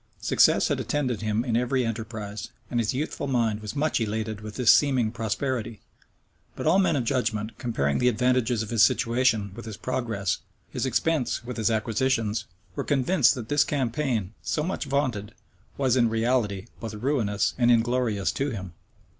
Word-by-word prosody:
Success - - +4
had - - 0
attended 130 -7 -1
him 110 +2 0
in 120 -3 0
every 125 +1 +1
enterprise; 110 -2 -5 0.2
and 120 - +1
his 115 - +1
youthful 145 +2 -3
mind 115 -5 +1
was 105 +5 -6
much 150 -3 0
elated 110 -1 -2
with 105 -1 -8
this 125 -3 +6
seeming 130 -6 +2
prosperity, 115 0 -3 0.8
but - - -5
all 170 +5 +4
men 190 - +3
of 135 - 0
judgment, 115 -3 -1
comparing 70 - 0
the 125 - +2
advantages 125 -1 +2
of 110 - -8
his 115 -2 +2
situation 115 -3 +3
with 115 +3 -9
his 110 -3 -7
progress, 115 -7 -2 0.3
his - - -2
expense 130 0 0
with 125 0 -6
his 110 0 +1
acquisitions, 110 -1 0 0.3
were - - -2
convinced 145 0 +3
that 120 -4 -6
this 145 +2 +3
campaign, 125 -7 -1
so 150 - -1
much 180 -1 -3
vaunted, 130 -7 -1 0.4
was, 130 -3 +2
in 120 -3 +3
reality, 110 -3 0
both 110 -2 -6
ruinous 105 -5 0
and 120 -1 +4
inglorious 115 -3 +2
to 140 +1 -1
him. 95 -7 -6
115 Hz, 170 wpm, -26 LUFS, 110-130 Hz, 0.8 s, this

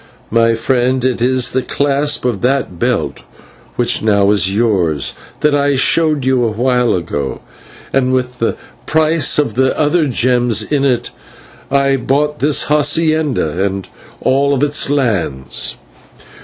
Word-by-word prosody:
My 115 0 +3
friend, 125 +2 0
it 125 -2 -1
is 130 0 +1
the 130 - 0
clasp 145 +1 -1
of 120 -6 -1
that 125 -9 -1
belt, - - -1 0.6
which - - +1
now 100 -2 +2
is 95 -2 +3
yours, 95 - 0 0.3
that 150 -1 +2
I 145 -1 +2
showed 150 +1 +2
you 130 -2 +2
a 115 - +1
while 125 +2 +1
ago, 70 -6 -4 0.5
and 130 -1 +1
with 125 -1 -2
the 115 - 0 0.3
price 155 0 +2
of 145 -7 0
the 130 +2 +1
other 155 +2 +2
gems 120 -4 +1
in 140 +4 -1
it 125 -3 0 0.6
I 140 0 +2
bought 145 +4 -1
this 145 +1 +2
/hacienda/ 150 - +1
and 95 -1 -3 0.3
all 140 +1 +1
its 145 -1 0
lands. 95 - -2
130 Hz, 140 wpm, -15 LUFS, 115-145 Hz, 0.6 s, My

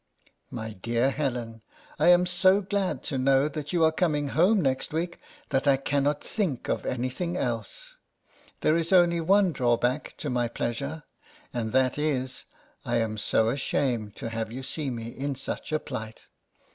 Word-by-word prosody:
MY 110 -2 -5
DEAR 120 +4 +1
HELEN: 120 -6 -3 0.4
I 155 - +4
am 175 0 +7
so 185 +2 +4
glad 190 -8 -1
to 135 - -1
know 135 +2 +4
that 150 0 -5
you 175 -2 +2
are 160 - +5
coming 155 -4 0
home 185 +9 +4
next 135 -1 0
week, 170 +2 -2 0.3
that 135 +2 0
I 135 -1 +5
cannot 140 +2 0
think 180 - -2
of - - -1
any 125 0 -1
thing 175 +6 -3
else. - - -3 0.6
There 155 - +3
is 165 +1 0
only 175 -2 +5
one 190 +2 +4
drawback 125 +1 0
to - - -3
my 120 -1 +1
pleasure, 140 +7 -3 0.5
and 115 -2 -2
that 130 +1 +2
is, 130 -4 -1 0.4
I - - 0
am 110 -1 0
so 110 +2 +2
ashamed 120 -4 -1
to 115 - -5
have 115 -1 -3
you 130 +3 -6
see 145 +1 -3
me 115 -2 -5
in 140 +3 -3
such 135 - -4
a 155 - +3
plight. 115 -7 -7
140 Hz, 170 wpm, -27 LUFS, 120-165 Hz, 0.6 s, am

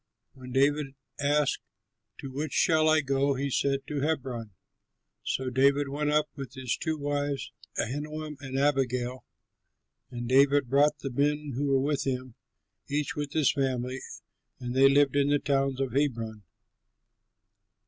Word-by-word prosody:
When 130 -2 -11
David 140 +1 +1 0.2
asked, 145 0 +1 0.6
"To 135 - -7
which 145 +2 -4
shall 155 -1 +4
I 155 0 +5
go?" 140 0 +1
he 140 +1 -2
said, 135 +1 0
"To 150 -1 -3
Hebron." 130 -7 -2 0.7
So 130 -1 -2
David 140 +2 +3
went 145 +2 -1
up 150 0 +2
with 135 -2 -8
his 130 -2 -2
two 160 -2 -2
wives, 145 -1 -2 0.3
Ahinoam 150 +3 -3
and 135 -1 -5
Abigail. 130 -3 0 0.9
And 120 -1 -5
David 140 +1 +4
brought 145 +2 +4
the 135 - -4
men 145 +3 0
who 140 +4 -1
were 135 -1 +3
with 140 0 -1
him, 130 -2 -3 0.5
each 145 0 -2
with 145 -1 -4
his 155 -4 +3
family, 130 -2 -2 0.6
and 125 -1 -4
they 135 +1 +7
lived 140 -1 +4
in 140 0 +3
the 145 - +4
towns 135 -2 0
about 135 -2 -2
Hebron. 115 -7 -1
140 Hz, 150 wpm, -28 LUFS, 130-145 Hz, 0.9 s, they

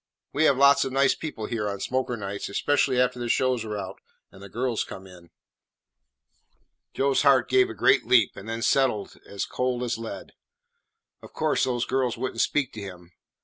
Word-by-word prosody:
We 150 +3 +2
have 140 -4 +4
lots 140 +1 +5
of 135 - -4
nice 135 +1 +3
people 150 -9 -6
here 105 -3 -2
on 100 0 -5
smoker 125 +2 -2
nights, 100 -1 -5
especially 130 +4 +1
after 125 0 +1
the 120 -1 -4
shows 125 -1 +1
are 105 -1 -5
out 100 - -7 0.3
and 95 - -15
the 100 - -10
girls 120 +1 -1
come 95 - -10
in." 90 -2 -15 1.7
Joe's 135 0 +2
heart 135 -2 +4
gave 385 -1 +3
a - - -7
great - - +3
leap, 115 -5 +4
and 100 +3 -9
then 115 0 -3
settled 130 -7 +1
as 100 - -4
cold 125 -1 -2
as 120 -2 -2
lead. 115 - -7 0.9
Of - - -14
course, - - +1
those 120 -2 -1
girls 130 -3 -1
would 130 +2 -3
n't 115 - -1
speak 145 -4 0
to 110 - -7
him. 90 -3 -10
120 Hz, 190 wpm, -25 LUFS, 105-130 Hz, 1.7 s, lots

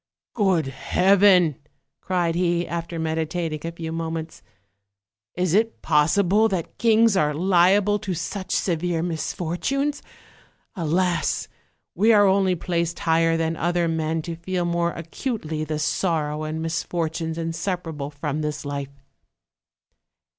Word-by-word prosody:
"Good 190 - +2
Heaven!" 180 +3 +3 0.4
cried 175 -3 0
he, 175 0 0
after 170 0 -4
meditating 160 0 -2
a 165 - -3
few 165 -1 -6
mo 165 0 -3
ments, 160 0 -6 0.9
"is 180 -2 0
it 225 +3 +1
possible 180 +8 +3
that 185 -5 -4
kings 225 -2 +4
are 150 -4 +2
liable 190 +4 +3
to 195 -4 -3
such 185 +3 -5
severe 170 -1 0
misfortunes? 180 - -2 0.7
Alas! 175 -1 0 0.5
we 215 +6 +4
are 205 -2 +6
only 190 -1 +3
placed 170 0 -2
higher 165 0 +2
than 165 0 -1
other 175 +1 0
men 160 0 -1
to 170 0 -5
feel 175 +1 -2
more 170 0 0
acutely 165 - -4
the 155 0 -3
sorrow 155 -1 -1
and 160 +1 -4
misfortunes 165 -1 -2
inseparable 165 -3 -3
from 150 +1 -4
this 150 -1 -3
life." 140 -1 -6
170 Hz, 125 wpm, -23 LUFS, 160-185 Hz, 0.9 s, are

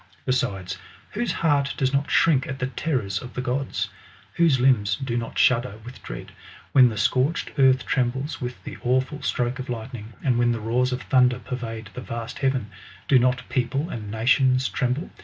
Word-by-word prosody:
Besides, 95 -8 -1 0.3
whose 240 +2 -1
heart 145 -4 +1
does 130 0 +1
not 140 +1 +1
shrink 145 -6 +3
at 130 - -4
the 125 - -1
terrors 125 -8 -2
of 125 - -10
the 125 - -1
gods? 130 +1 -2 0.4
Whose 165 -6 +3
limbs 115 -6 +3
do 130 -4 -3
not 115 -1 -3
shudder 120 -4 +3
with 125 - -10
dread, - - -8 0.4
when 130 -2 +7
the 110 - -6
scorched 130 +9 +1
earth 130 -1 +5
trembles 130 +3 -1
with 125 0 -5
the - - -7
awful 130 +4 0
stroke 125 +1 -1
of 130 - -6
lightning, 115 -1 -6
and 125 -3 +2
when 120 0 +3
the 115 - -3
roars 120 +4 +1
of 125 0 -3
thunder 125 -1 +4
pervade 115 -4 -6
the 125 - -6
vast 115 -2 -6
heaven? 130 -6 0 0.4
Dq 130 - +6
not 125 +1 +1
people 135 +5 -1
and 105 -3 -6
nations 130 +3 +3
tremble 130 +6 -1
125 Hz, 180 wpm, -24 LUFS, 120-135 Hz, 0.4 s, when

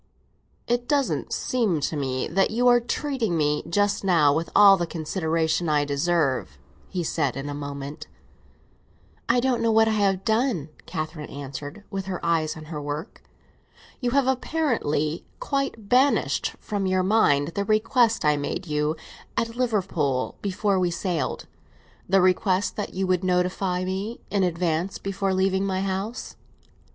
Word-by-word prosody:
"It 240 0 0
doesn't 280 -1 0
seem 220 -10 0
to 155 - -1
me 130 -3 -1
that 195 +4 +2
you 245 +3 +1
are 245 0 +6
treating 240 - -1
me 150 -1 +1
just 205 +4 +1
now 165 -7 +4
with 160 +2 -1
all 200 -1 +9
the 175 -3 -2
consideration 160 0 -1
I 150 -1 +2
deserve," 140 - 0 0.3
he 180 -2 -2
said 145 -5 -1
in 135 +1 -4
a - - -3
moment. 140 0 -6 1.2
"I 250 - +4
don't 245 -2 +1
know 230 - +2
what 220 0 +5
I - - +2
have 195 -1 +1
done," 220 - +1 0.2
Catherine 155 -2 -5
answered, 145 +6 -7
with 195 -2 -3
her 185 -2 -3
eyes 160 -1 +1
on 155 - -9
her 155 -1 -6
work. 145 +2 -5 0.8
"You 245 - 0
have 275 +2 +2
apparently 245 - 0 0.2
quite 275 - -2
banished 260 +5 +2
from 200 -3 -2
your 185 0 +2
mind 165 -8 +3
the 200 +4 -2
request 220 - +2
I 150 -1 +4
made 145 +6 -3
you 150 -1 0 0.4
at 230 0 -1
Liverpool, 185 - 0
before 200 0 0
we 180 -1 +2
sailed; 175 -1 -2 0.6
the 195 0 +5
request 185 +1 +2
that 205 - -5
you 190 +1 0
would 185 0 +1
notify 180 0 0
me 195 +5 -3
in 200 - +1
advance 175 0 0
before 195 0 -2
leaving 190 0 +1
my 190 -1 -1
house." 195 +5 -4
185 Hz, 155 wpm, -25 LUFS, 155-215 Hz, 1.2 s, all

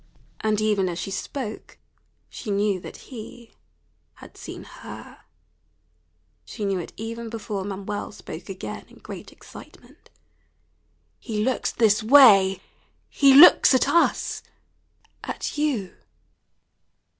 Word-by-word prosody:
And 215 -1 0
even 210 -3 +1
as 170 - -5
she 190 +3 -5
spoke 220 +3 -6 0.5
she 225 - -9
knew 200 -1 0
that - - -10 0.2
he 235 0 -11 0.6
had - - -15
seen - - -9
her; - - -12 1.2
she 215 - -6
knew 195 -2 -1
it 170 - -7
even 230 +1 -6
before 215 -3 -5
Manuel 200 +1 -5
spoke 170 -3 -10
again 190 -1 -7
in - - -19
great - - -10
excitement. - - -16 1.1
"He 215 -4 -3
looks 260 +2 -1
this 220 -2 +2
way 215 -7 +6 0.5
he 275 -2 +5
looks 290 -2 +8
at 255 - +2
us 340 - +1 0.8
at - - -5
you." 255 -12 -1
215 Hz, 115 wpm, -24 LUFS, 195-235 Hz, 1.2 s, looks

